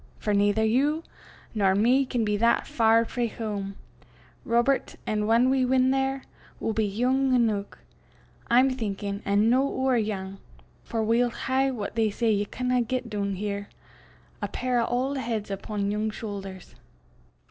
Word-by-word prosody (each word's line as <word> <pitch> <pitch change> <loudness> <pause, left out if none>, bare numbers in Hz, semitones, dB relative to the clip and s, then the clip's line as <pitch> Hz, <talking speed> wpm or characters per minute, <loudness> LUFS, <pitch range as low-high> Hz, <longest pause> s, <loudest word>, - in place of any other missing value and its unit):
For 210 - -1
naither 205 +2 +3
you 285 +8 +1 0.5
nor 195 -3 +2
me 250 +6 +3
can 240 -3 0
be 210 0 +1
that 235 +2 +2
far 230 0 +3
frae 240 0 -2
hame, 205 -3 -5 0.7
Robert, 240 +4 +1
an' 210 -1 -1
whan 230 +3 +4
we 265 -1 +2
win 255 0 +3
there, 270 0 0 0.4
we'll 220 - -1
be 220 -1 +1
yoong 255 +4 +2
eneuch, 215 -4 0 0.7
I'm 255 +3 +5
thinkin'; 205 -4 -4
an' 205 +2 +3
no 255 +2 +4
ower 265 -2 +1
yoong, 195 -3 -4 0.4
for 225 -2 -2
we'll 235 +3 +2
hae 265 +3 0
what 225 -6 -4
they 225 -2 +2
say 225 +2 0
ye 205 -1 +1
canna 250 +3 0
get 245 -1 -3
doon 200 -2 -2
here 200 +1 -4 0.7
a - - -1
pair 250 -1 -1
o' - - +1
auld 260 +4 -1
heids 225 -5 -3
upo' 200 +2 -5
yoong 210 +2 0
shoothers." 195 -4 -7
225 Hz, 160 wpm, -26 LUFS, 205-255 Hz, 0.7 s, I'm